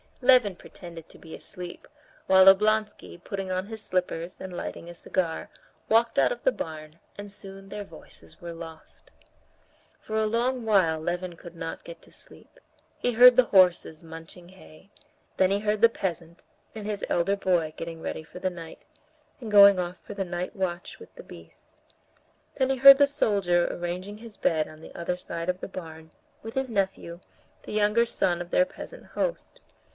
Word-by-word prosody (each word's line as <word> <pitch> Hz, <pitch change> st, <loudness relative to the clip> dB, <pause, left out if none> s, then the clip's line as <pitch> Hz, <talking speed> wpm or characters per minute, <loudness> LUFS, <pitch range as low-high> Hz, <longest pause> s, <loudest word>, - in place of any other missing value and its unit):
Levin 245 Hz, -7 st, +5 dB
pretended 170 Hz, -2 st, -11 dB
to -, -, -12 dB
be 160 Hz, -, -11 dB
asleep, 180 Hz, -1 st, -10 dB, 0.4 s
while 190 Hz, 0 st, +6 dB
Oblonsky, 210 Hz, 0 st, +3 dB
putting 195 Hz, -2 st, -5 dB
on 185 Hz, +1 st, -2 dB
his 220 Hz, -1 st, -8 dB
slippers, 180 Hz, -2 st, -3 dB
and 190 Hz, -1 st, -7 dB
lighting 170 Hz, -1 st, -6 dB
a -, -, -8 dB
cigar, 170 Hz, -1 st, -3 dB, 0.4 s
walked 230 Hz, +1 st, +3 dB
out -, -, +3 dB
of -, -, -5 dB
the -, -, +4 dB
barn, 155 Hz, -, -8 dB, 0.2 s
and 205 Hz, 0 st, -8 dB
soon 195 Hz, -1 st, -10 dB
their 205 Hz, +1 st, -6 dB
voices 155 Hz, -, -16 dB
were 170 Hz, 0 st, -7 dB
lost. 165 Hz, -1 st, -12 dB, 0.9 s
For 220 Hz, -, -4 dB
a 220 Hz, 0 st, +2 dB
long 240 Hz, +3 st, 0 dB
while 185 Hz, -8 st, +3 dB
Levin 175 Hz, +2 st, -3 dB
could 170 Hz, 0 st, -12 dB
not 165 Hz, -1 st, -6 dB
get 170 Hz, -1 st, -11 dB
to -, -, -18 dB
sleep. -, -, -17 dB, 0.4 s
He 245 Hz, -, 0 dB
heard 250 Hz, +2 st, +8 dB
the 255 Hz, 0 st, +5 dB
horses 180 Hz, -5 st, +3 dB
munching 165 Hz, +2 st, -11 dB
hay, 185 Hz, 0 st, -17 dB, 0.5 s
then 185 Hz, 0 st, +3 dB
he 200 Hz, -, +1 dB
heard 210 Hz, 0 st, -1 dB
the 230 Hz, -, +7 dB
peasant 170 Hz, -5 st, -5 dB, 0.3 s
and 215 Hz, -2 st, -7 dB
his 210 Hz, -1 st, -3 dB
elder 185 Hz, +3 st, +1 dB
boy 175 Hz, -5 st, 0 dB
getting 165 Hz, -1 st, -7 dB
ready 160 Hz, -, -5 dB
for 180 Hz, -, -12 dB
the 185 Hz, -, -1 dB
night, 165 Hz, -2 st, -10 dB, 0.6 s
and 230 Hz, -5 st, -7 dB
going 200 Hz, -2 st, +8 dB
off 180 Hz, +1 st, -3 dB
for -, -, -8 dB
the 195 Hz, -1 st, -3 dB
night 175 Hz, +3 st, -5 dB
watch 180 Hz, -2 st, -4 dB
with 455 Hz, -, -14 dB
the -, -, -11 dB
beasts, -, -, -14 dB, 0.8 s
then 260 Hz, -1 st, +1 dB
he 265 Hz, -, 0 dB
heard 275 Hz, +1 st, +10 dB
the 285 Hz, 0 st, +5 dB
soldier 200 Hz, -11 st, +1 dB
arranging 180 Hz, +4 st, -5 dB
his 225 Hz, -2 st, -12 dB
bed 155 Hz, -2 st, +1 dB
on 155 Hz, 0 st, -14 dB
the -, -, -12 dB
other 175 Hz, +1 st, -3 dB
side 170 Hz, -1 st, -5 dB
of 180 Hz, 0 st, -2 dB
the -, -, -5 dB
barn, 160 Hz, -4 st, -10 dB, 0.3 s
with 225 Hz, 0 st, -8 dB
his 265 Hz, -2 st, -2 dB
nephew, 190 Hz, -4 st, -2 dB, 0.4 s
the -, -, -9 dB
younger 210 Hz, +2 st, +2 dB
son 175 Hz, -6 st, 0 dB
of 175 Hz, -, -7 dB
their 275 Hz, -, +4 dB
peasant -, -, -11 dB
host. -, -, -3 dB
185 Hz, 180 wpm, -26 LUFS, 170-215 Hz, 0.9 s, heard